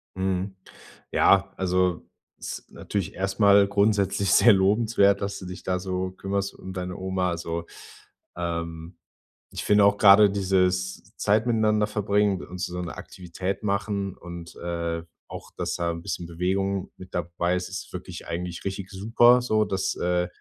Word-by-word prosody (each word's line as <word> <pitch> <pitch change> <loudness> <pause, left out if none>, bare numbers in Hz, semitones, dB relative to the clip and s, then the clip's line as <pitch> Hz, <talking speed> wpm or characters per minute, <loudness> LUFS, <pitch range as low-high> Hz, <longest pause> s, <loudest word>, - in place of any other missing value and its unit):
Mhm, 95 +1 -2 0.6
ja, - - +4
also, 90 -2 0 0.3
ist - - -8
natürlich 100 -4 -4
erstmal 100 +1 +4
grundsätzlich 100 -1 +1
sehr 120 - +7
lobenswert, 100 0 +3
dass 100 0 -3
du 95 - -9
dich 90 +1 -8
da 90 -1 -1
so 95 0 -3
kümmerst 100 +1 -3
um 95 - -9
deine 90 -1 -5
Oma. 95 -1 -1
Also, 85 -1 -4 0.7
ähm, 85 0 -4 0.5
ich - - -5
finde 105 -1 +5
auch 100 0 +4
grade 100 0 +7
dieses 95 -1 0
Zeit 110 +3 +2
miteinander 110 -2 +2
verbringen 105 -2 +1
und 90 +1 -9
so 90 -1 -3
'ne 85 -2 -6
Aktivität 95 +2 -5
machen 100 -1 -1
und, 85 -1 -9
äh, 85 -1 -3 0.3
auch, - - -9
dass - - -2
da 85 -1 -1
'n 85 0 -6
bisschen 85 - -4
Bewegung 95 +3 -1
mit 95 - -12
dabei 85 +1 -1
ist, 90 0 -3
ist 95 - -7
wirklich - - -8
eigentlich 90 0 -5
richtig 95 0 -4
super 115 +5 +4
so, 110 -3 +1
dass, 95 -2 -1
äh 90 0 0
95 Hz, 155 wpm, -25 LUFS, 90-100 Hz, 0.7 s, sehr